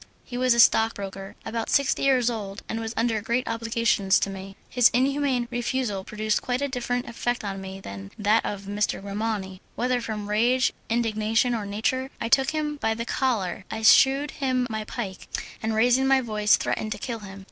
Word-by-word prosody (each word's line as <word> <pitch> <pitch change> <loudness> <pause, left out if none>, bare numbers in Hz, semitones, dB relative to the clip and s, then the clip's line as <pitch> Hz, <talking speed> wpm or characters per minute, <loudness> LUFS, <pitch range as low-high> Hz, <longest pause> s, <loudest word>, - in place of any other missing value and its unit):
He 245 - -9
was 250 -1 +3
a - - 0
stockbroker, 200 -4 +2
about 225 0 -3
sixty 280 -1 +2
years 260 -3 +3
old, 200 -3 -6
and 225 - -3
was 225 0 -5
under 225 -1 +1
great 235 +4 -1
obligations 230 -4 +2
to 195 - 0
me. 195 0 -8
His 245 -2 +5
inhuman 265 -1 +1
refusal 240 -4 -2
produced 215 +1 -1
quite 250 0 -1
a 285 - 0
different 245 -2 -2
effect 240 0 -2
on 195 -1 -4
me 190 0 -7
than 100 - -8
that 210 +2 +3
of 200 -1 -5
M. 205 +1 -5
Grimani. 200 -2 -2
Whether 250 0 0
from 210 -3 -4
rage, 240 +5 +2 0.2
indignation, 225 +1 +1
or 215 -3 -3
nature, 240 +6 -1
I 230 - -2
took 270 +1 +4
him 305 -1 -2
by 225 -5 0
the 230 +1 -4
collar, 215 -8 -1
I 220 0 -5
shewed 270 +5 +6
him 255 -3 0
my 215 -1 -3
pike, 205 -6 -6 0.3
and 220 0 -1
raising 245 +4 +3
my 270 0 +5
voice 210 -4 +2
threatened 215 -1 -2
to - - -8
kill 230 +2 -4
him. 195 -2 -10
225 Hz, 190 wpm, -25 LUFS, 210-250 Hz, 0.3 s, shewed